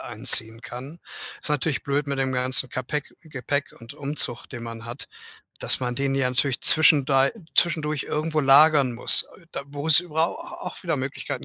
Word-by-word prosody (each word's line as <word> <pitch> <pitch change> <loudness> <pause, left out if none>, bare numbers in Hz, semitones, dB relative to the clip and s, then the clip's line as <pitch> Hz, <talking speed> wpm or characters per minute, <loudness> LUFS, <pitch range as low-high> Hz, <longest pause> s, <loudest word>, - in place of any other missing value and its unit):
einziehen 115 +1 +4
kann. 135 +5 -11 0.4
Ist - - -3
natürlich 150 0 -2
blöd 145 +1 -3
mit 140 -1 -5
dem 130 -1 -2
ganzen 130 0 +2
Kapeck 130 +3 -6
Gepäck 145 -1 -6
und 115 -1 -13
Umzug, 140 -4 -2
den 120 -2 -10
man 115 0 -10
hat, 120 - -10 0.5
dass - - +3
man 125 -1 -5
den 135 0 -2
ja 130 -2 -1
natürlich 125 0 -1
zwischendei 140 -3 +3 0.2
zwischendurch 155 -4 0
irgendwo 155 +1 -4
lagern 140 -1 +3
muss, 120 - +6
äh, 170 - -22
da - - -7
wo's 145 +3 +1
über 160 -2 -2
au - - -9
au 335 +1 -11
auch - - -13
wieder - - -2
Möglichkeiten - - -7
140 Hz, 180 wpm, -22 LUFS, 125-150 Hz, 0.5 s, muss